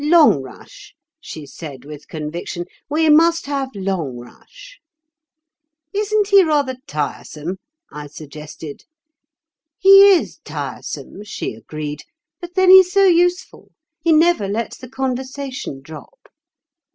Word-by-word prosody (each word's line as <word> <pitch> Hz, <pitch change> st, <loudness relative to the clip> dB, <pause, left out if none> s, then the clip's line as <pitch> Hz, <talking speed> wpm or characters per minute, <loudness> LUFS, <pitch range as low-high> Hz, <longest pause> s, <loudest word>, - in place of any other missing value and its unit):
'Longrush,' 300 Hz, -, +1 dB, 0.2 s
she 155 Hz, -, -9 dB
said 140 Hz, -2 st, -10 dB
with 150 Hz, -1 st, -11 dB
conviction, 165 Hz, +3 st, -5 dB, 0.2 s
'we 315 Hz, +2 st, +1 dB
must 330 Hz, +2 st, +4 dB
have 275 Hz, -2 st, -2 dB
Longrush.' 190 Hz, -, -6 dB, 1.1 s
'Isn't 415 Hz, 0 st, 0 dB
he 400 Hz, -1 st, +7 dB
rather 290 Hz, -5 st, 0 dB
tiresome?' 150 Hz, +3 st, -4 dB, 0.3 s
I 150 Hz, 0 st, -8 dB
suggested. 150 Hz, 0 st, -10 dB, 0.9 s
'He 390 Hz, +1 st, +8 dB
is 365 Hz, -, +1 dB
tiresome,' 205 Hz, -, -7 dB
she 210 Hz, -, -5 dB
agreed, 150 Hz, +6 st, -7 dB, 0.4 s
'but 350 Hz, -1 st, -10 dB
then 375 Hz, -1 st, +5 dB
he's 375 Hz, -1 st, +8 dB
so 395 Hz, +1 st, +4 dB
useful. 355 Hz, 0 st, +1 dB, 0.3 s
He 330 Hz, +1 st, +1 dB
never 320 Hz, -, +3 dB
lets 220 Hz, +4 st, -4 dB
the 255 Hz, -, -11 dB
conversation 260 Hz, -, -4 dB
drop. 155 Hz, +1 st, -13 dB
260 Hz, 110 wpm, -19 LUFS, -, 1.1 s, He